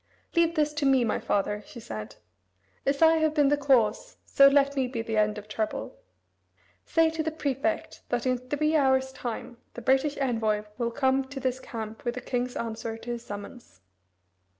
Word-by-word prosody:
"Leave 335 Hz, 0 st, +3 dB
this 300 Hz, -1 st, +1 dB
to 300 Hz, -1 st, -3 dB
me, 270 Hz, -2 st, +4 dB
my 220 Hz, -, 0 dB
father," 205 Hz, +1 st, -1 dB
she 235 Hz, -, -10 dB
said. 110 Hz, -, -7 dB, 0.7 s
"As 280 Hz, +3 st, +2 dB
I 325 Hz, 0 st, +6 dB
have 315 Hz, -1 st, +1 dB
been 290 Hz, -3 st, +4 dB
the 290 Hz, -, +4 dB
cause, 270 Hz, -, +2 dB
so 275 Hz, -, +6 dB
let 280 Hz, 0 st, +4 dB
me 265 Hz, -2 st, +1 dB
be 240 Hz, -3 st, -4 dB
the 225 Hz, -1 st, -3 dB
end 210 Hz, 0 st, +2 dB
of 210 Hz, 0 st, -8 dB
trouble. 215 Hz, -, -3 dB, 0.9 s
Say 325 Hz, -1 st, +3 dB
to 320 Hz, 0 st, -2 dB
the 315 Hz, -, -1 dB
prefect 290 Hz, -1 st, -2 dB
that 245 Hz, 0 st, -1 dB
in 255 Hz, -1 st, +1 dB
three 290 Hz, +5 st, 0 dB
hours' 265 Hz, -2 st, +3 dB
time 240 Hz, -1 st, -6 dB, 0.2 s
the 240 Hz, -, -6 dB
British 270 Hz, +4 st, +2 dB
envoy 225 Hz, -6 st, 0 dB, 0.2 s
will 235 Hz, -1 st, +1 dB
come 265 Hz, +2 st, +1 dB
to 270 Hz, +1 st, -7 dB
his 260 Hz, -1 st, -1 dB
camp 220 Hz, -3 st, -7 dB
with 240 Hz, 0 st, -2 dB
the 250 Hz, -, -5 dB
king's 245 Hz, 0 st, -2 dB
answer 225 Hz, 0 st, -4 dB
to 240 Hz, +1 st, -6 dB
his 235 Hz, -1 st, -5 dB
summons." 205 Hz, -, -9 dB
255 Hz, 190 wpm, -27 LUFS, 225-285 Hz, 0.9 s, I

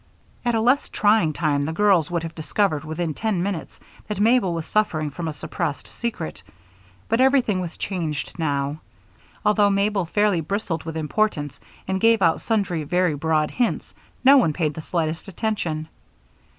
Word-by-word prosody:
At 240 Hz, -1 st, +1 dB
a 225 Hz, -, +2 dB
less 250 Hz, +5 st, +2 dB
trying 205 Hz, -6 st, +3 dB
time 150 Hz, -2 st, 0 dB
the 160 Hz, -, -2 dB
girls 185 Hz, -3 st, +3 dB
would 170 Hz, -2 st, -1 dB
have 165 Hz, 0 st, -5 dB
discovered 160 Hz, 0 st, 0 dB
within 160 Hz, +1 st, -3 dB
ten 205 Hz, -1 st, -1 dB
minutes 190 Hz, -4 st, -4 dB, 0.3 s
that 210 Hz, -2 st, -4 dB
Mabel 220 Hz, -3 st, +3 dB
was 165 Hz, -1 st, -3 dB
suffering 155 Hz, -8 st, 0 dB
from 165 Hz, +4 st, -5 dB
a -, -, -1 dB
suppressed 150 Hz, 0 st, -4 dB
secret; 215 Hz, -, -5 dB, 0.7 s
but 230 Hz, -, +2 dB
everything 260 Hz, -8 st, +3 dB
was 175 Hz, -2 st, -6 dB
changed 165 Hz, -4 st, -4 dB
now. 145 Hz, -1 st, -1 dB, 0.6 s
Although 210 Hz, -1 st, +4 dB
Mabel 200 Hz, -1 st, +1 dB
fairly 205 Hz, -2 st, +2 dB
bristled 170 Hz, -1 st, -3 dB
with 160 Hz, -1 st, -4 dB
importance 155 Hz, -3 st, -1 dB, 0.3 s
and 190 Hz, 0 st, -1 dB
gave 225 Hz, -3 st, +4 dB
out 165 Hz, -1 st, +3 dB
sundry 195 Hz, -8 st, 0 dB
very 180 Hz, +2 st, +1 dB
broad 155 Hz, +1 st, 0 dB
hints, 245 Hz, -2 st, -1 dB, 0.3 s
no 275 Hz, +2 st, +9 dB
one 165 Hz, -, +3 dB
paid 155 Hz, -2 st, -1 dB
the 160 Hz, -, -6 dB
slightest 165 Hz, +2 st, -2 dB
attention. 175 Hz, -6 st, -2 dB
175 Hz, 165 wpm, -23 LUFS, 155-210 Hz, 0.7 s, no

